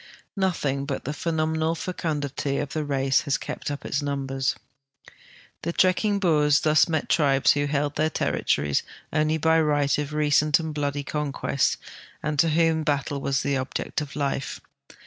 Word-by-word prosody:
Nothing 150 -8 0
but 140 - -4
the 145 - -2
phenomenal 160 0 0
fecundity 145 -5 -2
of 145 - -2
the 155 - -1
race 135 -2 +1
has 140 - 0
kept - - -5
up 145 0 -5
its 140 - -1
numbers. 135 -2 -1 1.1
The 170 - -2
trekking 195 +3 +2
Boers 150 -6 +3
thus 155 +2 +4
met 160 -2 -1
tribes 140 -4 +4
who 145 0 +1
held 145 0 -1
their 155 +1 +2
territories 75 - 0 0.3
only 155 +1 +2
by 160 +1 +3
the 160 - +4
right 145 -1 +2
of 150 0 -3
recent 150 0 +3
and 160 -1 -4
bloody 145 -1 -2
coii(|uest 145 -2 -1 0.5
and 150 -1 -1
to 165 - +5
whom 160 0 +2
battle 145 -2 -1
was 135 0 0
the 140 - 0
olqect 130 +4 -2
of 145 -2 -7
life. 140 -2 -2
150 Hz, 165 wpm, -25 LUFS, 140-160 Hz, 1.1 s, to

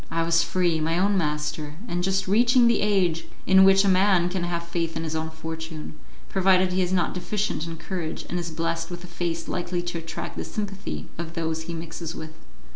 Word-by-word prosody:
I 165 0 0
was 165 0 +4
free, 170 -1 +1
my 165 +2 0
own 200 +2 +3
master, 150 -2 -1
and 175 -3 -1
just 190 0 +1
reaching 240 +5 +5
the 235 -1 +4
age 190 -5 +2 0.2
in 190 +1 +7
which 195 +1 +6
a - - +3
man 185 -2 +4
can 180 -1 -2
have 170 -1 -2
faith 165 -1 -2
in 165 - -3
his 160 0 -3
own 160 0 -2
fortune, 160 0 -6 0.3
provided 185 -1 +3
he 185 - +2
is 180 0 0
not 185 -2 +1
deficient 180 -2 -2
in 165 0 -6
courage, 170 -2 -4
and 175 - -2
is 170 -1 -4
blessed 165 +1 -2
with 175 0 -7
a - - -8
face 170 -1 -3
likely 175 0 -2
to 175 -1 -3
attract 165 0 -6
the - - -2
sympathy 200 -2 -5
of 170 0 -5
those 160 -1 -1
he 170 - -4
mixes 165 0 -6
with. 155 0 -7
175 Hz, 210 wpm, -25 LUFS, 165-190 Hz, 0.3 s, in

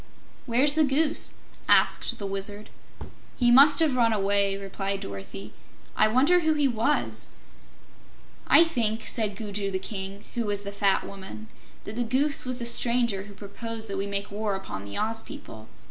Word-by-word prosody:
"Where's 260 +5 +3
the 315 +1 +3
Goose?" 295 +2 0 0.4
asked 235 - +3
the 205 - -6
Wizard. 200 +2 -1 0.7
"He 240 -2 +3
must 280 +3 +7
have 310 -4 +3
run 235 -2 +3
away," 200 -1 +2
replied 195 0 -4
Dorothy. 100 +1 -8 0.4
"I - - +4
wonder 275 +11 +4
who 315 -2 +1
he 290 -2 +2
was?" 250 +4 -1 1.2
"I - - +7
think," 230 -9 -1
said 215 -3 -1
Gugu 205 -1 -3
the 190 - -2
King, 195 +1 -6
who 235 -2 -2
was 205 -1 -1
the 200 - -6
fat 200 -1 +1
Woman, 200 +2 -10 0.3
"that 205 - -7
the 245 - +1
Goose 270 +5 +1
was 255 -1 -3
the 240 - -1
stranger 235 -4 +2
who 205 -1 -13
proposed 225 +3 -6
that 195 - -3
we 200 - -2
make 200 0 -4
war 205 -1 -2
upon 145 - -7
the 100 - -7
Oz 225 +1 0
people. 110 - -11
215 Hz, 170 wpm, -26 LUFS, 200-245 Hz, 1.2 s, must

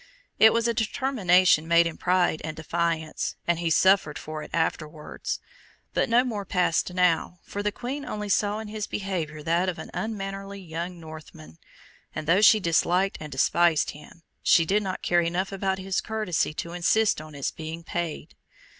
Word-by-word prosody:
It 220 - +8
was 230 0 +1
a 235 - +1
determination 200 - +2
made 170 0 +5
in 165 - -3
pride 180 -3 +1
and 155 0 -5
defiance, 160 -1 -2
and 170 -1 +1
he 170 -1 0
suffered 185 -2 +3
for 155 0 -6
it - - -9
afterwards; 155 -2 -3 0.5
but - - +1
no 240 +2 +5
more 220 -5 -3
passed 180 -2 0
now, 180 -1 +1
for 205 - -5
the 210 0 0
Queen 260 +6 -5
only 210 -5 -5
saw 205 +1 +1
in 220 0 -6
his 210 0 -4
behaviour 165 -6 -4
that 170 +4 +1
of 175 - -4
an - - -8
unmannerly 195 -2 -5
young 175 0 -6
Northman: 155 - -12 0.6
and 155 - -4
though 175 +6 +4
she 215 0 +7
disliked 180 +2 +1
and 155 -1 -7
despised 165 +4 +2
him, 150 +3 -15 0.2
she 165 - +4
did 205 +5 +2
not 190 -2 -4
care 175 0 +3
enough 175 +3 -1
about 195 -1 -1
his 190 -1 -2
courtesy 215 -9 -1
to 170 +2 -5
insist 205 +2 +2
on 155 -1 -11
its 140 - -2
being 160 +1 -7
paid. 170 -2 -4
180 Hz, 175 wpm, -26 LUFS, 160-200 Hz, 0.6 s, It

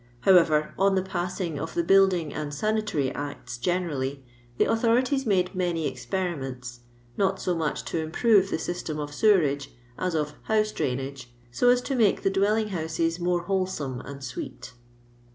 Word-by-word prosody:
However, 160 -3 +4
on 195 0 +4
the 190 - +1
passing 180 -4 -3
of 160 - -5
tho 170 - +1
Building 185 -4 +4
and 150 -1 -4
Sanitary 210 -5 0
Acts 125 -4 -6
gene 180 +6 0
rally, 135 -3 -4 0.3
the - - +4
authorities 250 +4 +2
made 185 -3 +2
many 175 -4 -1
experiments, 130 -5 -4 0.4
not 195 -1 +1
so 180 - 0
much 150 -8 -2
to 140 +8 -2
improve 195 +5 +3
the - - -1
system 160 -2 -4
of 145 -1 -5
sewerage 150 -7 +3 0.3
iis 180 -2 0
of 150 -1 -1
house 215 -1 +2
drainagi', 135 -2 -3 0.2
so 245 - +3
as 245 0 +4
to 275 - -2
make 225 -6 +2
the 195 - +2
dwelling 210 +3 +2
housi 165 -3 -1
s 165 +1 -1
inorf 175 0 0
wholesome 185 -9 -2
and 140 -1 -9
sweet. 125 -1 -7
175 Hz, 165 wpm, -26 LUFS, 145-195 Hz, 0.4 s, However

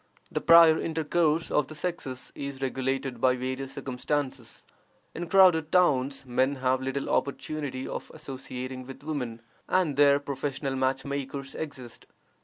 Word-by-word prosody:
The - - -1
prior 165 -1 +7
intercourse 160 0 0
of 150 -3 +2
the 155 - -9
sexes 150 -6 -5
is 140 -1 -6
regulated 130 -1 -2
by 130 -1 +4
various 130 +1 -4
circumstances. 135 +1 -3 0.5
In 175 +1 -5
crowded 180 -5 +5
towns 140 -6 +2
men 130 +2 +1
have 130 0 +1
little 135 +1 -2
opportunity 140 -1 -2
of - - -6
associating 130 -3 -7
with 135 +1 -10
women, 125 -7 -4 0.3
and 175 -7 +2
there 140 -1 +6
professional 140 -1 -3
match 130 0 0
makers 140 0 -4
exist. 130 -6 -7
140 Hz, 135 wpm, -28 LUFS, 130-155 Hz, 0.5 s, prior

